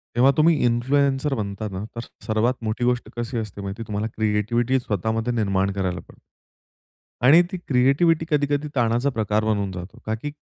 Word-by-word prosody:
तेव्हा 130 +3 +5
तुम्ही 160 +1 +5
इन्फ्लुएन्सर 135 +4 +1
बनता 105 0 -4
ना, 95 +2 -5
तर 115 - -4 0.2
सर्वात 115 +3 +1
मोठी 110 +3 -2
गोष्ट 125 0 0
कशी 120 +1 -3
असते 105 -2 -5
माहिती 100 +3 -5
तुम्हाला 105 +1 -2
क्रिएटिव्हिटी 115 +4 +1
स्वतः 110 -2 -2
मध्ये 120 +2 -1
निर्माण 100 -3 +1
करायला 90 -3 -2
पडते. - - -17 1.1
आणि 160 +6 +8
ती 185 - -3
क्रिएटिव्हिटी 145 +6 +3
कधी-कधी 145 0 +1
ताणाचा 120 +3 +2
प्रकार 110 -3 0
बनून 100 -3 0
जातो. 90 +5 -8
का 110 +1 -1
की 145 +6 -6
115 Hz, 165 wpm, -23 LUFS, 105-135 Hz, 1.1 s, आणि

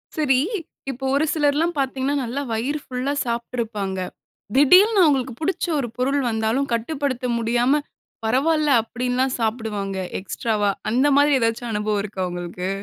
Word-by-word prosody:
சரி! 270 -5 +3 0.5
இப்ப 265 -1 -6
ஒரு 290 +3 +2
சிலர்லாம் 310 +2 +1
பார்த்தீங்கன்னா, 270 +1 0
நல்லா 250 +4 -3
வயிறு 265 +7 -1
ஃபுல்லா 255 +2 -2
சாப்பிட்டுருப்பாங்க. 230 -5 -3 0.6
திடீருன்னு 370 +9 +6
அவங்களுக்கு 265 -4 +1
புடிச்ச 370 +4 0
ஒரு 240 - -2
பொருள் 275 +3 +1
வந்தாலும் 225 +5 0
கட்டுப்படுத்த 260 +1 -2
முடியாம. 240 +5 +2 0.4
"பரவால்ல" 300 +6 +2
அப்டிலாம் 250 +3 -1
சாப்பிடுவாங்க. 215 -4 -2 0.2
எக்ஸ்ட்ராவா! 210 +1 -1 0.2
அந்த 260 +4 +3
மாதிரி 285 -1 +5
ஏதாச்சும் 230 +1 -1
அனுபவம் 210 0 0
இருக்கா 200 -2 -5
உங்களுக்கு? 175 +1 -5
250 Hz, 125 wpm, -22 LUFS, 220-285 Hz, 0.6 s, திடீருன்னு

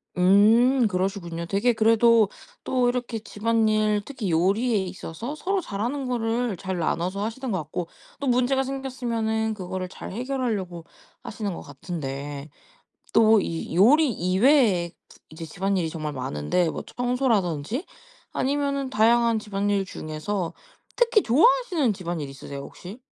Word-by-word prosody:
음 220 +7 +5
그러시군요. 180 -3 -2
되게 205 +7 +1
그래도 225 -1 +4 0.3
또 250 -1 +1
이렇게 245 -2 -3
집안 225 +1 0
일 215 -1 +2
특히 225 -10 -4
요리에 205 +8 +2
있어서 190 - -6
서로 380 +4 -1
잘 200 -9 -6
하는 265 +3 -2
거를 230 -3 -1
잘 190 0 -4
나눠서 180 +5 -1
하시는 235 +3 -4
거 190 - 0
같고 160 +3 -5 0.3
또 280 - -3
문제가 255 +2 +2
생겼으면은 235 -5 -2
그거를 185 -2 -5
잘 - - -9
해결하려고 220 -8 -3 0.4
하시는 210 -3 -4
거 - - -7
같은데. 145 -1 -6 0.6
또 220 -2 +5
이 165 -1 -4
요리 270 - +5
이외에 190 - +3 0.4
이제 160 +1 -9
집안 195 +5 -2
일이 165 -3 0
정말 155 -2 -5
많은데 130 - -1
뭐 - - -5
청소라든지 245 - 0 0.5
아니면은 280 -1 -1
다양한 230 0 +3
집안일 200 -1 -1
중에서 165 +1 -4 0.4
특히 470 -3 +3
좋아하시는 315 - +3
집안 175 -3 -4
일 140 - -5
있으세요 140 +1 -8
혹시? 180 - -10
215 Hz, 315 characters per minute, -25 LUFS, 180-245 Hz, 0.6 s, 음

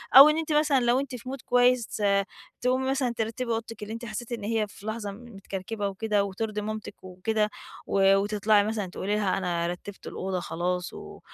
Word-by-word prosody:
أو 275 +3 +12
إن 305 - +2
أنتِ 320 -1 -2
مثلًا 300 -2 +4
لو 240 +1 +3
أنتِ 275 -2 -4
في 250 +1 -8
mood 270 - -4
كويس 245 -2 +3 0.6
تقومي 260 +1 +1
مثلًا 265 -3 +1
ترتبي 230 +2 -2
أوضتِك 230 0 -3
اللي 210 +1 -5
أنتِ 230 +1 -6
حسيتِ 230 +2 -6
إن 230 -3 -4
هي 220 0 0
في 200 - -14
لحظة 220 -2 -3
متكركبة 200 -1 -5
وكده 205 +1 0
وترضي 210 +2 -3
مامتِك 215 -1 -6
وكده 210 +4 -1 0.4
و 195 0 +5
وتطلعي 205 +1 +3
مثلًا 215 -1 -1
تقولي 200 +3 -2
لها 200 -3 +1
أنا 175 -2 -1
رتبت 180 +3 -7
الأوضة 190 -1 -3
خلاص 180 +1 -2
و - - -10
215 Hz, 185 wpm, -27 LUFS, 195-240 Hz, 0.6 s, أو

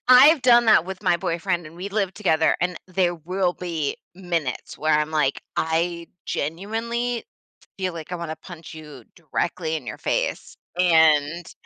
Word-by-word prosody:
I've 270 +4 +8
done 240 -1 +6
that 215 -6 +6
with 190 +1 -7
my 180 -3 +3
boyfriend, 170 0 -2
and 155 - -12
we 185 +3 -5
live 200 -2 -1
together, 160 -6 +2
and 180 0 0
there 180 -1 +1
will 180 +3 -1
be 165 -5 -3 0.2
minutes 170 -7 -3
where 155 0 +2
I'm 150 +1 -1
like, 150 -3 0
"I 170 +1 0 0.2
genuinely 225 +9 -2 0.5
feel 185 -1 -1
like 165 +2 -8
I - - -1
wanna 165 -2 -5
punch 165 -1 -11
you 150 -5 -11
directly 165 0 -2
in 140 -6 -8
your - - -6
face." - - -2 0.2
And 160 -2 +3
175 Hz, 160 wpm, -23 LUFS, 160-190 Hz, 0.5 s, I've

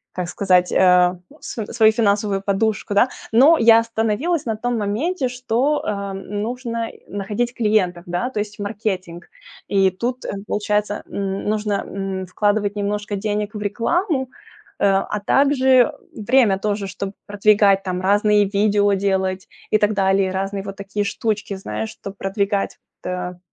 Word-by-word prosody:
как 180 -1 -3
сказать, 180 -2 +2
э, 180 -1 +4 0.2
ну, 300 - -17
св 220 -3 -5
свою 220 0 +6
финансовую 205 -2 +1
подушку, 205 +1 0
да. 220 +5 +4 0.2
Но 275 +9 +6
я 230 0 +7
остановилась 230 +8 -1
на 225 - -1
том 240 +2 -2
моменте, 255 - -1
что, 250 +4 0
э, 200 -1 -3
нужно 230 +4 -4 0.2
находить 210 +5 -3
клиентов, 205 -6 +1
да, 175 +8 -2
то 240 - -4
есть 210 +1 -5
в - - -5
маркетинг. 195 -5 -4 0.4
И 195 -1 +3
тут, 240 +7 -4
э, - - -4 0.2
получается, 210 0 -1
н 195 -1 -3
нужно, 210 -1 -1
м, 195 -1 -4
вкладывать 205 +2 0
немножко 205 0 -2
денег 210 +1 -2
в - - -4
рекламу, 265 - 0 0.6
э, - - +2
а 195 +2 +1
также, 265 -3 +4 0.2
время 225 -2 +3
тоже, 205 0 -2
чтоб 195 +1 -5
продвигать 205 -1 +3
там 180 -1 -3
разные 205 +2 +3
видео 205 0 +2
делать 190 -1 -1 0.2
и 215 - +4
так 210 +1 +2
далее, 195 -1 +2
разные 195 +1 -2
вот 195 0 -7
такие 200 +1 -3
штучки, 210 -1 -2
знаешь, 110 - -4
чтоб 195 0 -9
продвигать 200 +1 -1 0.2
та 180 -1 -5
205 Hz, 150 wpm, -21 LUFS, 195-225 Hz, 0.6 s, я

